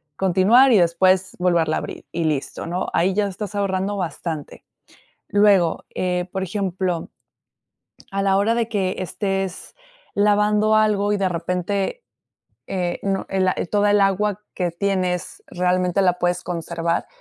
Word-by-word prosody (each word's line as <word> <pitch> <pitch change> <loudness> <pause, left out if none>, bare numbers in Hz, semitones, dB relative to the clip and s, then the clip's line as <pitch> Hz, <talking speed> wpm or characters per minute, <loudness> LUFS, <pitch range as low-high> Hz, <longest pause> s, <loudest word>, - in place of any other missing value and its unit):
Continuar, 195 - +4
y 215 - +6
después, 185 +2 +2
volverla 170 -3 +2
abrir, - - -7
y 170 0 -2
listo, 150 -3 -2
¿no? 175 +2 -2
Ahí 185 +3 +2
ya 205 +1 +1
estás 205 +2 -6
ahorrando 200 0 -1
bastante. 160 -3 -5 0.7
Luego, 200 -5 +3
eh, 180 0 -1
por 190 -1 -2
ejemplo, 185 -3 -2 1.0
a 195 - -1
la 195 0 +2
hora 215 +3 +2
de 230 -1 -1
que 195 -4 -1
estés 195 +1 -3 0.4
lavando 210 +1 +3
algo, 210 -1 +2
y 205 - +1
de 190 -2 +1
repente, 180 - -2 0.6
eh, 180 -2 -2
no 195 -1 -1
la 185 -1 +1 0.2
toda 205 0 +3
el 205 0 +4
agua 200 +1 +1
que 180 -2 -1
tienes, 180 0 -2
realmente 180 +1 +1
la 180 -1 +2
puedes 175 0 0
conservar. 170 -1 -2
190 Hz, 140 wpm, -22 LUFS, 180-205 Hz, 1.0 s, y